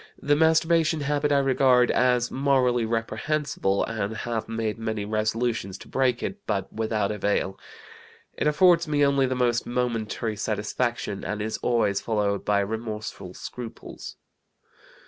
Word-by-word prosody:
The 145 +1 +2
masturbation 160 0 +3
habit 145 +1 0
I 140 - +4
regard 130 -2 +4
as 125 -1 +2
morally 130 -3 +2
reprehensible 115 -1 -1
and 110 -1 -3
have 115 -2 -3
made 115 -1 -2
many 110 -2 -3
resolutions 110 -1 -1
to - - -13
break 130 -2 +1
it, 195 - -3
but 100 -3 -2
without 110 -2 -1
avail. 100 -2 -1 0.8
It - - 0
affords 170 +2 +4
me 145 -1 +3
only 140 -1 +3
the 130 - -1
most 120 -1 +1
momentary 115 -3 -2
satisfaction, 105 0 -2
and 105 0 -3
is 110 +1 -3
always 115 -5 +1
followed 105 -3 0
by 100 -1 +2
remorseful 105 -3 -5
scruples. 120 -2 -8
115 Hz, 135 wpm, -25 LUFS, 110-135 Hz, 0.8 s, I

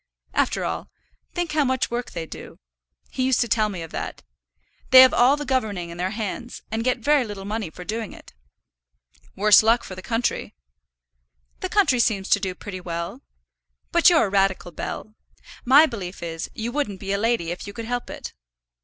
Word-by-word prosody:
After - - +1
all, - - -4 0.5
think 350 -3 -1
how 300 -1 +2
much 260 -2 0
work 240 0 -3
they 165 - -5
do. - - -10 0.5
He - - -3
used 255 -1 +2
to 240 - +1
tell 215 -1 +2
me 185 -5 -5
of 165 - -10
that. - - -5 0.7
They 255 0 +10
have 260 -1 +7
all 260 +4 +5
the 295 - -5
governing 210 -10 -1
in 170 - -9
their 180 +2 -1
hands, 220 +3 -5
and 225 +1 -1
get 250 0 +1
very 285 +3 +3
little 205 -4 -7
money 210 -3 -3
for 180 - -10
doing 220 +1 -4
it." - - -14 1.0
"Worse 210 +1 +7
luck 230 +2 +3
for - - -8
the 185 - -8
country." 225 - -2 1.0
"The 370 - -3
country 370 -12 +3
seems 205 -4 +1
to - - +4
do 190 -3 -3
pretty 185 -1 -8
well. 170 -1 -5 0.7
But 340 +1 +6
you're 325 -8 +4
a - - -3
radical, 195 -2 +1
Bell. 215 +5 -6 0.5
My 280 +5 +8
belief 195 - -6
is, 165 -1 -5
you 230 +2 -3
wouldn't 240 -9 -2
be 195 0 -4
a 200 - 0
lady 225 -7 0
if 180 - -6
you - - -6
could 230 +1 -6
help 245 +1 -3
it." - - -7
220 Hz, 195 wpm, -23 LUFS, 190-255 Hz, 1.0 s, They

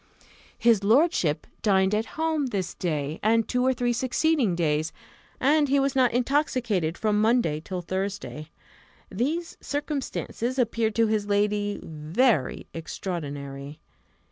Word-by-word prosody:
His 230 -4 +3
lordship 225 - +3 0.2
dined 190 -2 +3
at 215 +2 0
home 315 -3 0
this 190 -7 -3
day, 155 -3 -2
and 225 +1 +3
two 250 0 0
or 260 - +4
three 245 -1 0
succeeding 255 - +1
days, 155 -2 0 0.5
and 290 +2 +3
he 280 +1 +4
was 275 0 0
not 255 -2 +4
intoxicated 240 - 0
from 210 -1 +1
Monday 220 -9 +2
till 185 0 -4
Thursday. 185 -4 -4 0.6
These 300 - -2
circumstances 280 -4 -3
appeared 230 -3 +1
to 230 - +4
his 215 -2 0
lady 205 0 +1
very 160 - 0
extraordinary. 145 -4 -6
215 Hz, 125 wpm, -26 LUFS, 175-255 Hz, 0.6 s, or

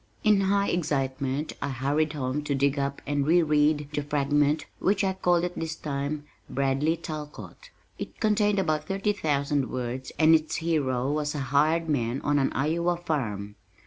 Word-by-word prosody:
In 210 -2 +4
high 200 +1 +2
excitement 140 -3 -1
I 140 - -1
hurried 145 +4 0
home 140 0 -2
to 145 - 0
dig 140 +1 +1
up 140 0 -3
and 145 0 0
re 170 +2 +5
read 150 -1 +2
the 150 - 0
fragment 145 +1 +1
which 200 +1 +2
I 190 -1 +1
called 175 -2 +2
at 180 0 -2
this 160 -1 -3
time 145 0 -3 0.3
Bradley 140 +4 +1
Talcott. 155 - -8 0.3
It - - -7
contained 210 -2 +2
about 155 -5 0
thirty 195 +2 0
thousand 145 -6 0
words 125 +1 -4
and 160 0 +6
its 155 -1 +2
hero 140 -6 0
was 150 0 -1
a - - -2
hired 160 +3 +3
man 125 -4 0
on 145 0 +2
an 135 - +1
Iowa 170 +5 0
farm. 105 - -3
150 Hz, 170 wpm, -27 LUFS, 140-165 Hz, 0.3 s, and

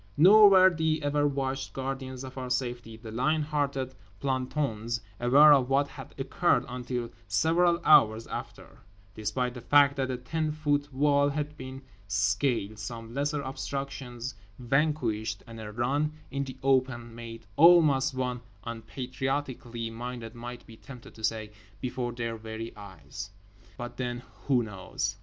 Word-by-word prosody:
Nor 205 +6 +9
were 190 -1 +7
the 160 -1 0
ever 145 0 +2
watchful 135 -1 -2
guardians 130 -1 -4
of 130 0 -8
our 130 -1 -5
safety, 120 -3 -3
the 110 -1 -9
lion 150 +7 +1
hearted 140 -3 -1 0.3
plantons, 130 -4 -1 0.2
aware 140 +5 +7
of 135 -3 +3
what 140 +1 +2
had - - -11
occurred - - +1
until 125 -1 -4 0.2
several 165 - +3
hours 110 -6 +6
after; - - -8 0.3
despite 115 +4 -2
the 125 - -8
fact 140 +2 +5
that 130 -1 0
a 130 - -2
ten 155 +5 -2
foot 145 -1 0
wall 140 +1 +3
had 150 +1 -3
been 130 -1 -8 0.2
scaled, 105 +2 0
some 115 +1 -7
lesser 145 +1 -1
obstructions 130 -2 -5 0.2
vanquished, 125 -6 0
and 115 -1 -10
a 105 -1 -7
run 140 +7 0 0.2
in 140 0 -2
the 130 -1 -8
open 130 -3 +1
made 115 -1 -9
almost 150 -4 +6
(one 125 -1 -2 0.2
unpatriotically 120 0 -4
minded 120 0 -6
might 120 +1 -8
be 115 - -13
tempted 125 -2 -12
to 110 - -13
say) 110 -1 -1 0.3
before 125 -1 -3
their 115 -1 -4
very 110 +1 -7
eyes. 95 -2 -9 0.5
But 120 -1 -7
then—who 120 0 -1
knows? 95 -1 -4
130 Hz, 145 wpm, -29 LUFS, 115-140 Hz, 0.5 s, Nor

